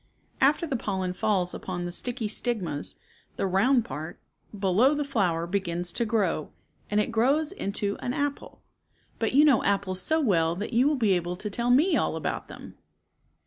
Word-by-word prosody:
After 290 Hz, +5 st, +3 dB
the 280 Hz, -, -2 dB
pollen 190 Hz, -5 st, -2 dB
falls 185 Hz, -2 st, 0 dB
upon 175 Hz, -2 st, -5 dB
the 175 Hz, -, -4 dB
sticky 230 Hz, +4 st, -1 dB
stigmas, 205 Hz, -, -2 dB, 0.4 s
the -, -, -1 dB
round 230 Hz, +6 st, +3 dB
part, 160 Hz, -6 st, -7 dB, 0.4 s
below 205 Hz, +9 st, +3 dB
the 295 Hz, 0 st, -1 dB
flower 185 Hz, -11 st, 0 dB
begins 175 Hz, -2 st, -2 dB
to 235 Hz, -, 0 dB
grow, 200 Hz, -9 st, 0 dB, 0.4 s
and 210 Hz, -, +1 dB
it 210 Hz, -, 0 dB
grows 275 Hz, +8 st, +2 dB
into 200 Hz, -, -2 dB
an 245 Hz, -, -3 dB
apple, 285 Hz, 0 st, -3 dB, 0.6 s
but 225 Hz, 0 st, 0 dB
you 290 Hz, +3 st, +6 dB
know 275 Hz, -6 st, +4 dB
apples 195 Hz, -2 st, 0 dB
so 315 Hz, +10 st, +1 dB
well 170 Hz, -, +2 dB
that 205 Hz, +6 st, -5 dB
you 245 Hz, +4 st, +4 dB
will 300 Hz, -, +2 dB
be 225 Hz, -7 st, +2 dB
able 175 Hz, 0 st, -1 dB
to 210 Hz, +3 st, -5 dB
tell 235 Hz, +4 st, 0 dB
me 300 Hz, +10 st, +4 dB
all -, -, 0 dB
about -, -, -3 dB
them. -, -, -12 dB
210 Hz, 180 wpm, -27 LUFS, 180-255 Hz, 0.6 s, you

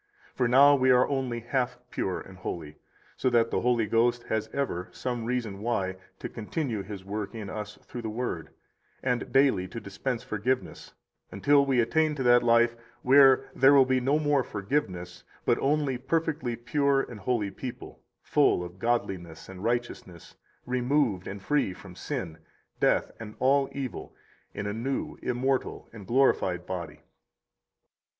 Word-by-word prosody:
58 -, -, -34 dB
For 125 Hz, -, +2 dB
now 140 Hz, +4 st, +7 dB
we 130 Hz, -2 st, +3 dB
are 125 Hz, 0 st, +5 dB
only 130 Hz, -4 st, -2 dB
half 125 Hz, +1 st, -1 dB
pure 95 Hz, -, -2 dB
and 95 Hz, -1 st, -12 dB
holy, 80 Hz, -4 st, -6 dB, 0.4 s
so 130 Hz, -, +1 dB
that 115 Hz, -1 st, +2 dB
the -, -, 0 dB
Holy 120 Hz, -2 st, +2 dB
Ghost 120 Hz, +3 st, +2 dB
has 110 Hz, 0 st, -1 dB
ever 110 Hz, -9 st, -2 dB
[some 120 Hz, -3 st, -4 dB
reason 115 Hz, -5 st, -2 dB
why] 100 Hz, -4 st, -1 dB, 0.2 s
to -, -, -5 dB
continue 115 Hz, 0 st, -3 dB
His 100 Hz, -1 st, -8 dB
work 105 Hz, +2 st, -4 dB
in 105 Hz, -3 st, -6 dB
us 105 Hz, 0 st, -6 dB
through 120 Hz, -, -7 dB
the 110 Hz, -, -4 dB
Word, 110 Hz, -8 st, -4 dB, 0.5 s
and 125 Hz, -2 st, -1 dB
daily 135 Hz, -9 st, +3 dB
to 115 Hz, -, -7 dB
dispense 115 Hz, +4 st, -4 dB
forgiveness, 125 Hz, +5 st, -3 dB, 0.4 s
until 140 Hz, -1 st, +3 dB
we 130 Hz, -2 st, +2 dB
attain 150 Hz, +7 st, +2 dB
to 135 Hz, -, -2 dB
that 120 Hz, 0 st, +6 dB
life 115 Hz, 0 st, +4 dB, 0.3 s
where 135 Hz, 0 st, +6 dB
there 135 Hz, +2 st, +6 dB
will 135 Hz, -1 st, +7 dB
be 130 Hz, 0 st, +2 dB
no 135 Hz, +4 st, +2 dB
more 145 Hz, -3 st, +2 dB
forgiveness, 95 Hz, -6 st, -3 dB, 0.2 s
but -, -, +2 dB
only 140 Hz, -2 st, +1 dB
perfectly 145 Hz, -3 st, -1 dB
pure 135 Hz, +4 st, +1 dB
and 120 Hz, -4 st, -9 dB
holy 105 Hz, -1 st, -1 dB
people, 125 Hz, +5 st, -8 dB, 0.2 s
full 90 Hz, -, +3 dB
of 90 Hz, +1 st, -10 dB
godliness 95 Hz, -8 st, -2 dB
and 95 Hz, 0 st, -10 dB
righteousness, 115 Hz, -7 st, -3 dB, 0.3 s
removed 125 Hz, -5 st, 0 dB
and 100 Hz, 0 st, -7 dB
free 140 Hz, -10 st, +1 dB
from 95 Hz, -1 st, -12 dB
sin, 85 Hz, -2 st, -5 dB, 0.4 s
death, -, -, +2 dB
and 105 Hz, -2 st, -8 dB
all 135 Hz, +1 st, +3 dB
evil, 135 Hz, -3 st, -6 dB, 0.4 s
in 105 Hz, -, -4 dB
a 100 Hz, -, -2 dB
new, 135 Hz, +7 st, -3 dB
immortal, 130 Hz, +2 st, -1 dB
and 105 Hz, -4 st, -11 dB
glorified 105 Hz, -9 st, +2 dB
body. 85 Hz, -4 st, -6 dB
120 Hz, 160 wpm, -28 LUFS, 100-135 Hz, 0.5 s, now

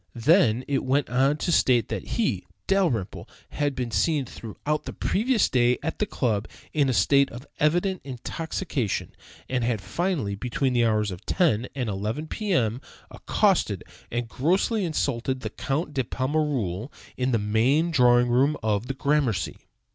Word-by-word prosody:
Then 125 Hz, -, +4 dB
it 140 Hz, -1 st, 0 dB
went 135 Hz, 0 st, 0 dB
on 135 Hz, +4 st, +3 dB
to 170 Hz, -, -1 dB
state 125 Hz, -7 st, +3 dB
that -, -, -4 dB
he 230 Hz, -3 st, 0 dB, 0.2 s
(Dalrymple) 170 Hz, -, 0 dB, 0.2 s
had 145 Hz, -2 st, -1 dB
been 125 Hz, -2 st, -3 dB
seen 135 Hz, -, +1 dB
throughout 135 Hz, +7 st, -4 dB
the -, -, -6 dB
previous 230 Hz, +2 st, +2 dB
day 125 Hz, -1 st, +3 dB
at 160 Hz, -, -3 dB
the 210 Hz, -, +1 dB
club 110 Hz, -, -1 dB, 0.3 s
in 145 Hz, -3 st, +2 dB
a -, -, +3 dB
state 140 Hz, +3 st, +4 dB
of 120 Hz, +4 st, -10 dB
evident 175 Hz, +5 st, +1 dB
intoxication, 135 Hz, -, -3 dB, 0.4 s
and 130 Hz, -2 st, -1 dB
had, 115 Hz, -2 st, 0 dB
finally, 150 Hz, -, -2 dB
between 125 Hz, +5 st, -1 dB
the 120 Hz, -1 st, +3 dB
hours 105 Hz, -2 st, +1 dB
of 90 Hz, -, -8 dB
10 130 Hz, -, +2 dB
and 125 Hz, -4 st, -2 dB
11 110 Hz, +10 st, -3 dB
P. 215 Hz, -2 st, -3 dB
M., 120 Hz, -, +1 dB, 0.3 s
accosted -, -, +1 dB, 0.3 s
and 120 Hz, 0 st, -2 dB
grossly 185 Hz, -, +1 dB
insulted 130 Hz, -5 st, -1 dB
the 110 Hz, -, -4 dB
Count 150 Hz, +6 st, -2 dB
de 135 Hz, -2 st, 0 dB
Pommereul 130 Hz, -, -1 dB, 0.2 s
in 130 Hz, 0 st, 0 dB
the 115 Hz, -, +3 dB
main 120 Hz, +11 st, +2 dB
drawing 125 Hz, -4 st, +5 dB
room 135 Hz, +5 st, +3 dB
of 110 Hz, +1 st, 0 dB
the 135 Hz, -, -3 dB
Gramercy. 135 Hz, -, 0 dB
130 Hz, 160 wpm, -25 LUFS, 115-150 Hz, 0.4 s, drawing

